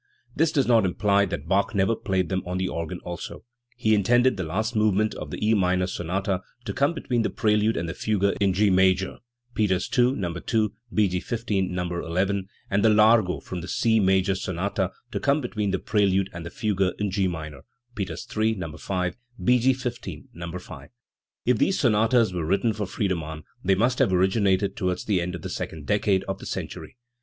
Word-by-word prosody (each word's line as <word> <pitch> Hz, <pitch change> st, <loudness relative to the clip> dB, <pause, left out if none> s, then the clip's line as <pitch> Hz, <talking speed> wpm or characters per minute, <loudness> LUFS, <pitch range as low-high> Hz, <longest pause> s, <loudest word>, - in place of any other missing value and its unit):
This 160 Hz, 0 st, +2 dB
does 140 Hz, -4 st, +2 dB
not 115 Hz, -3 st, +4 dB
imply 100 Hz, +2 st, +2 dB
that 80 Hz, -5 st, -5 dB
Bach 100 Hz, +3 st, +1 dB
never 100 Hz, +4 st, +2 dB
played 95 Hz, -4 st, -1 dB
them 95 Hz, -1 st, 0 dB
on 90 Hz, +1 st, -3 dB
the 95 Hz, 0 st, 0 dB
organ 85 Hz, +1 st, -4 dB
also. 85 Hz, -1 st, -7 dB, 0.3 s
He 110 Hz, -3 st, +2 dB
intended 120 Hz, +5 st, +4 dB
the 95 Hz, -, -4 dB
last 110 Hz, +8 st, -2 dB
movement 110 Hz, 0 st, +2 dB
of -, -, -7 dB
the -, -, -5 dB
E 110 Hz, -, +4 dB
minor 90 Hz, -2 st, +2 dB
sonata 95 Hz, +1 st, -2 dB, 0.2 s
to -, -, -3 dB
come 140 Hz, +5 st, +1 dB
between 125 Hz, -6 st, -1 dB
the -, -, 0 dB
prelude 105 Hz, +1 st, +1 dB
and 85 Hz, -, -2 dB
the 80 Hz, -, -3 dB
fugue 105 Hz, 0 st, -1 dB, 0.2 s
in 100 Hz, -1 st, +4 dB
G 100 Hz, +2 st, +3 dB
major 95 Hz, 0 st, +2 dB, 0.3 s
(Peters 95 Hz, -4 st, +1 dB
II, 125 Hz, +1 st, +4 dB
No. 90 Hz, -8 st, -3 dB
2; 105 Hz, +4 st, 0 dB, 0.2 s
B. 105 Hz, -2 st, +3 dB
G. 90 Hz, -1 st, -1 dB
XV, 115 Hz, +3 st, -5 dB, 0.2 s
No. 90 Hz, 0 st, -2 dB, 0.3 s
n) 95 Hz, 0 st, 0 dB, 0.2 s
and 100 Hz, +1 st, +2 dB
the 110 Hz, -, +6 dB
largo 105 Hz, -3 st, +4 dB
from 90 Hz, -2 st, -6 dB
the 85 Hz, -, -7 dB
C 110 Hz, +2 st, +2 dB
major 95 Hz, 0 st, +3 dB
sonata 95 Hz, +1 st, -2 dB, 0.2 s
to -, -, -2 dB
come 140 Hz, +2 st, +2 dB
between 110 Hz, -6 st, -2 dB
the 95 Hz, -, +1 dB
prelude 100 Hz, -1 st, +1 dB
and 85 Hz, -1 st, -6 dB
the -, -, -6 dB
fugue 105 Hz, 0 st, -2 dB, 0.2 s
in 105 Hz, -2 st, -1 dB
G 95 Hz, -1 st, +1 dB
minor 80 Hz, -5 st, -6 dB, 0.3 s
(Peters 95 Hz, 0 st, -5 dB
III, 110 Hz, +1 st, +2 dB
No. 85 Hz, -6 st, -6 dB
5; 90 Hz, 0 st, -2 dB, 0.3 s
B, 125 Hz, 0 st, +4 dB
G. 130 Hz, +3 st, +4 dB
XV, 125 Hz, -2 st, -3 dB, 0.3 s
No. 85 Hz, 0 st, -6 dB
5). 80 Hz, -5 st, -11 dB, 0.6 s
If 125 Hz, -3 st, +2 dB
these 195 Hz, -, +2 dB
sonatas 115 Hz, -3 st, +3 dB
were 85 Hz, -2 st, -2 dB
written 100 Hz, +7 st, +1 dB
for 105 Hz, -2 st, -3 dB
Friedemann, 80 Hz, -6 st, -3 dB, 0.2 s
they 95 Hz, +1 st, +3 dB
must 120 Hz, +6 st, +1 dB
have -, -, +3 dB
originated 95 Hz, +1 st, +2 dB
towards 90 Hz, -2 st, -2 dB
the 100 Hz, -5 st, +1 dB
end 90 Hz, +1 st, -3 dB
of 85 Hz, -, -9 dB
the -, -, -3 dB
second 80 Hz, -3 st, -5 dB
decade 100 Hz, 0 st, +2 dB
of 95 Hz, 0 st, -4 dB
the -, -, -8 dB
century. -, -, -6 dB
100 Hz, 205 wpm, -25 LUFS, 90-110 Hz, 0.6 s, the